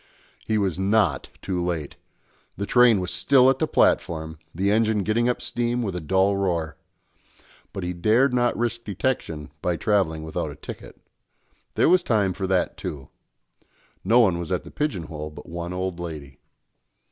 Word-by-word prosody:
He 110 - +1
was 95 -4 0
not 95 -6 +1
too 90 -2 -2
late; 85 -5 -3 0.6
the 100 - -2
train 120 -2 +5
was 90 -1 -3
still 130 +9 +5
at - - -3
the - - +1
platform, 80 -1 +1
the 95 +5 0
engine 110 -1 +2
getting 115 +4 +1
up 125 - -2
steam 120 0 -1
with 100 -5 -3
a 90 - -3
dull 95 +5 +2
roar. 85 -5 -1 1.0
But 95 - -5
he 90 0 -2
dared 110 +9 +3
not 120 -1 +1
risk 115 0 -2
detection 95 - -3
by 90 -1 0
travelling 85 -7 +1
without 80 - -3
a - - -9
ticket. - - -10 0.8
There - - +4
was 180 +2 +5
time 105 - +1
for 95 +1 -3
that, 95 -1 0
too. 70 -3 -6 0.9
No 115 +6 +4
one 95 -8 +3
was 85 0 -5
at 90 - -1
the - - -12
pigeon 145 - -2
hole 75 -1 -6
but 75 - -12
one 85 +1 -5
old 90 -1 -3
lady. 75 -6 -7
95 Hz, 170 wpm, -24 LUFS, 85-110 Hz, 1.0 s, train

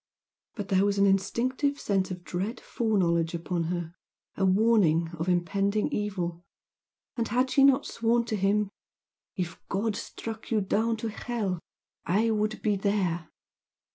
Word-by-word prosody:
But 205 -3 -5
there 190 0 +4
was 200 0 +1
an 200 - +5
instinctive 255 +9 +1
sense 195 -2 0
of 180 -1 -6
dread 195 +7 -3
foreknowledge 170 -7 +1
upon 170 0 -2
her, 170 -1 -3 0.4
a 195 - -1
warning 185 -5 +3
of 165 +3 -1
impending 195 +4 +1
evil, 175 -5 -2 0.7
and 230 -2 -1
had 255 +3 +1
she 275 - +5
not 275 0 +5
sworn 235 +1 +1
to 220 - -2
him 200 +1 +1 0.6
"If 180 -2 -4
God 210 +2 0
struck 225 +1 -7
you 225 - +2
down 220 +3 +1
to 225 +1 -3
hell 210 -5 -3 0.4
I 215 +6 +2
would 215 0 -1
be 210 -2 +2
there!" 190 -5 0
200 Hz, 145 wpm, -28 LUFS, 180-225 Hz, 0.7 s, an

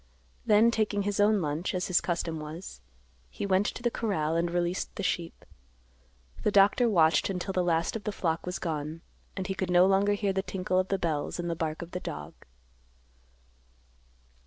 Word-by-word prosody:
Then, 220 +2 +6
taking 210 -3 0
his 205 0 -2
own 205 -1 +4
lunch, 155 +5 -2
as 180 - -1
his 185 - +2
custom 165 -2 -2
was, 155 - -8 0.5
he - - -5
went 195 +1 +2
to 240 - -5
the 240 - +1
corral 165 -10 -1
and 170 +1 +1
released 175 +1 -2
the 200 - -4
sheep. 170 -2 -3 1.0
The - - +2
doctor 205 +4 +4
watched 165 -4 +3
until 190 0 -3
the 185 - +1
last 170 +1 +1
of 220 - -5
the 210 - -1
flock 170 -3 -2
was 180 - -2
gone, 155 -1 -4 0.4
and 190 - -2
he 190 - -2
could 190 -1 -3
no 180 0 +6
longer 195 +2 +3
hear 200 -1 0
the 190 - 0
tinkle 185 -1 -1
of 185 - 0
the 195 - 0
bells 155 -5 -2
and 175 -1 -2
the - - -2
bark 160 -1 -3
of 170 - -11
the 180 - -3
dog. 75 - -7
185 Hz, 190 wpm, -28 LUFS, 165-200 Hz, 1.0 s, Then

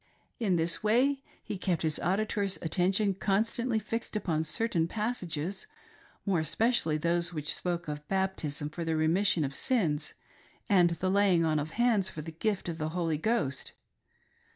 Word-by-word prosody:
In 200 -6 +2
this 165 0 +1
way 255 +6 +3 0.2
he 200 - -5
kept 180 -4 0
his 155 -1 +1
auditor's 200 +1 0
attention 195 +4 +2
constantly 220 +5 0
fixed 225 +2 -4
upon 165 -6 0
certain 165 0 0
passages, 190 -5 -2 0.6
more 190 -5 +2
espe 220 +9 +2
cially 160 -11 +2
those 170 +2 +1
which 150 -1 -1
spoke 175 -2 -3
of 150 0 -5
baptism 165 -6 -1
for 170 +2 -4
the 165 -1 0
remission 165 +2 +2
of 135 -1 -2
sins, 160 - 0 0.5
and 185 -5 +5
the 170 +2 -1
laying 190 -4 +4
on 155 -1 +2
of 155 +3 -4
hands 225 -5 +3
for 155 - -7
the 165 - -7
gift 200 +5 -2
of 165 -1 -4
the 155 0 -1
Holy 165 -2 -1
Ghost. 160 - -1
180 Hz, 160 wpm, -30 LUFS, 160-210 Hz, 0.6 s, and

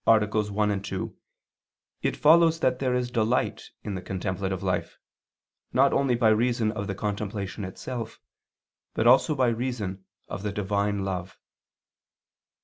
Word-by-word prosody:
1, 115 -1 +7
2, - - -11
ad 105 -1 +1 0.4
1), - - -4 0.9
it - - 0
follows 165 +1 +5
that 130 -3 +1
there 130 -2 +1
is 125 -1 -1
delight 115 +1 0
in 105 - -4
the 95 - -4
contemplative 95 0 -3
life, 90 -2 -2 0.8
not 135 +2 +4
only 135 -3 +2
by 115 -2 +4
reason 115 0 +2
of 100 -2 -4
the 100 - -3
contemplation 100 0 -3
itself, 115 +4 -6 0.8
but 110 - +1
also 130 +5 +5
by 130 -2 +3
reason 115 -5 -3 0.2
of - - -5
the 105 0 -2
Divine 100 0 -1
love. 95 -1 -4
110 Hz, 140 wpm, -26 LUFS, 100-125 Hz, 0.9 s, 1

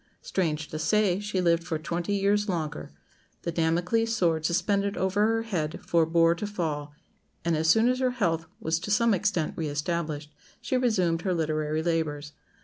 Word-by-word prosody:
Strange 155 -5 -1
to 155 - -5
say, 195 +2 +2
she 205 -2 -2
lived 170 -2 +2
for 165 -1 -2
twenty 170 +5 -2
years 205 +1 +1
longer; 155 - -3 0.5
the 170 - -2
Damocles' 175 +8 +1
sword 165 -6 +1
suspended 200 +4 0
over 200 +3 +2
her 225 0 +1
head 165 -9 -3
forbore 165 0 +3
to 210 - -3
fall, 150 -7 -3 0.5
and 170 -1 +2
as 160 +1 +1
soon 225 +7 +5
as 255 +1 +1
her 260 -1 +2
health 170 -10 -1
was 160 -6 0
to 185 - -6
some 230 +2 +3
extent 185 -4 0
re 160 - -2
established 150 0 -3 0.3
she 240 +2 -2
resumed 185 -10 +1
her 185 0 0
literary 155 -1 -1
labours. 150 -3 -1
170 Hz, 170 wpm, -27 LUFS, 160-205 Hz, 0.5 s, soon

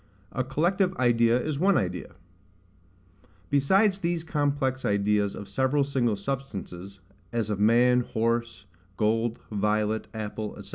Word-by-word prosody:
A 130 - -1
collective 180 +8 0
idea 120 -1 +3
is 145 +1 -3
one 195 +2 +4
Idea. 90 -6 -3 1.4
Besides 190 +8 +3
these 170 -2 -1
complex 145 -4 -1
ideas 100 0 +1
of 100 - -8
several 135 +2 +1
SINGLE 130 -5 0
substances, 100 -6 -6 0.3
as 115 -3 -1
of 100 - -2
man, 120 +4 +4
horse, 115 -3 -1 0.3
gold, 115 +2 +1
violet, 105 +1 0
apple, 110 -1 -5
&c. - - -12
120 Hz, 125 wpm, -27 LUFS, 105-140 Hz, 1.4 s, one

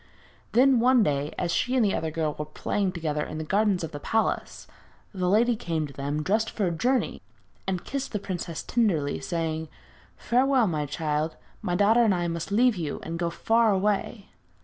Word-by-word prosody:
Then, 255 +1 +5
one 250 0 +5
day, 145 -3 0
as 170 - -1
she 250 +1 0
and 245 -4 +4
the 200 - +1
other 160 - -1
girl 155 -1 -1
were 150 - -5
playing 190 +5 -2
together 155 -4 -2
in 155 - -6
the 155 - -3
gardens 200 +1 +1
of 165 - -4
the 145 - -6
palace, 220 +9 -1 0.5
the 180 -2 0
lady 230 +4 +4
came 165 -6 -2
to 140 - -10
them, 145 +3 -3
dressed 220 +6 +1
for 210 - -1
a 175 - 0
journey, 245 +10 0 0.5
and 185 -2 -2
kissed 275 -1 -4
the 210 - -1
princess 175 -4 -5
tenderly, 175 -12 +1
saying: 160 -2 -2 0.5
'Farewell, 255 0 +3
my 155 -6 -1
child; 150 +1 -2 0.3
my 175 - -1
daughter 220 +5 +4
and 210 -4 +3
I 175 -1 -1
must 170 +3 -4
leave 235 +1 +3
you 160 -4 -3
and 165 +1 -5
go 170 -1 0
far 225 +6 +2
away.' 200 +1 -1
185 Hz, 195 wpm, -26 LUFS, 160-225 Hz, 0.5 s, Then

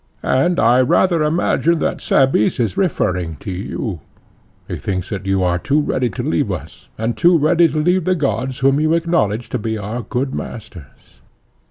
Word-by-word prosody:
And 150 +7 +1
I 120 +2 +4
rather 170 +6 +2
imagine 165 +1 +1
that - - -2
Cebes 130 -5 +2
is 115 -5 0
referring 90 - -1
to 95 +7 -7
you; 95 - -4 0.7
he - - -4
thinks 95 -1 -4
that 95 -2 -5
you 95 -1 +1
are 90 -1 +1
too 140 - +1
ready 130 -4 0
to - - -5
leave - - 0
us, - - -8
and 115 +2 -2
too 175 0 +4
ready 165 +3 +4
to 155 0 -4
leave 180 +3 +1
the 185 - +2
gods 135 -4 -2
whom 135 +1 +3
you 155 +2 +2
acknowledge 120 -10 0
to 125 - -2
be 110 +1 -3
our 105 +4 -4
good 130 +2 -3
masters. 95 - -9
130 Hz, 180 wpm, -18 LUFS, 105-155 Hz, 0.7 s, I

